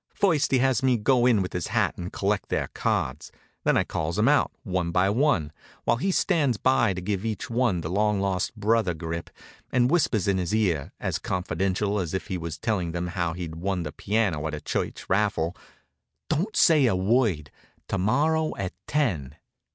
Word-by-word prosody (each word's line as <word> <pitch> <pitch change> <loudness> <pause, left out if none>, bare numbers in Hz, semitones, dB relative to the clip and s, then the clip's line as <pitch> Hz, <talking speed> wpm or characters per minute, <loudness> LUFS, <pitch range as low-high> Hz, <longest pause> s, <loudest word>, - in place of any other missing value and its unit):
First 160 -7 +2
he 135 - +3
has 130 0 +2
me 130 -2 +3
go 120 +2 +3
in 110 -6 +4
with 90 - -6
his 90 -2 -2
hat - - +1
and 90 +1 -6
collect 100 0 -1
their - - -1
cards. 65 - -2 0.3
Then - - +4
I - - +3
calls 80 +3 -3
'em 105 +3 +3
out, 150 0 +3
one 90 -6 -1
by 90 +3 +2
one, 105 - +1 0.3
while - - +2
he 190 +11 -1
stands 155 - +2
by 120 -5 +2
to 90 - -4
give 100 +1 -2
each 110 0 -4
one 115 -7 +1
the 80 - -4
long 105 +1 +1
lost 95 +1 -1
brother 105 -4 +1
grip, 85 +1 -5 0.4
and 125 +1 +3
whisper 165 -9 +3
in 95 -1 +2
his 90 +4 -1
ear, 90 -10 0
as - - -2
confidential 95 +3 -1
as 90 -2 -3
if 95 - -4
he 95 - -1
was 85 -2 -5
telling 90 -5 -1
him 90 +1 -2
how 85 -1 -1
he'd 85 -2 -6
won 90 0 -2
the 75 - -5
piano 95 -8 0
at 75 - -3
a 75 - -7
church - - -3
raffle: 95 -4 +1 0.7
"Don't 180 +8 -1
say 155 -6 +5
a 110 - +2
word; 95 - +1 0.4
to 100 - -1
morrow 155 +10 +1
at 95 -2 -3
ten." 90 - -1
100 Hz, 195 wpm, -26 LUFS, 85-120 Hz, 0.7 s, say